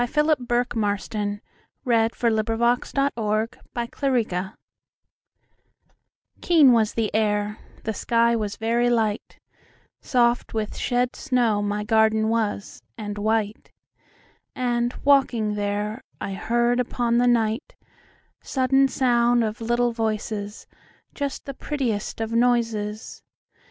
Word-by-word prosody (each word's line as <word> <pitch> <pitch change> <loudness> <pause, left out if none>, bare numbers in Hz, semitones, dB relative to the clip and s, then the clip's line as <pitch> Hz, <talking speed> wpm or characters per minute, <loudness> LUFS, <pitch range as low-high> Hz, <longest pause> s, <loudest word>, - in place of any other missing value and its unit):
Philip 300 +1 +2
Bourke 245 +1 0
Marston 205 -1 -2 0.4
1850–87 235 +3 +1 0.2
Garden 235 +1 -4
Fairies 220 -9 -1 1.9
KEEN 315 -7 +6
was 225 -2 +2
the 225 -2 -1
air, 210 -1 0 0.2
the 220 - -2
sky 235 +1 +2
was 210 -3 -2
very 235 +2 +1
light, 220 -3 -1 0.6
Soft 240 -2 +1
with 215 -1 -2
shed 245 0 0
snow 240 -7 +1
my 205 0 -2
garden 220 0 +3
was, 215 -3 -2 0.2
and 205 -2 -5
white, 215 0 -1 0.8
And, 240 -1 0
walking 260 -7 +3
there, 210 +3 -2 0.2
I 195 - -4
heard 240 +4 +1
upon 240 -1 0
the 245 - +3 1.2
nightSudden 270 +1 +2
sound 240 -2 +2
of 220 +1 -3
little 240 +1 +1
voices, 215 -2 -3 0.5
Just 280 -2 -4
the 275 - -5
prettiest 250 -9 -3
of 225 0 -3
noises. 230 -3 0
230 Hz, 105 wpm, -24 LUFS, 215-245 Hz, 1.9 s, KEEN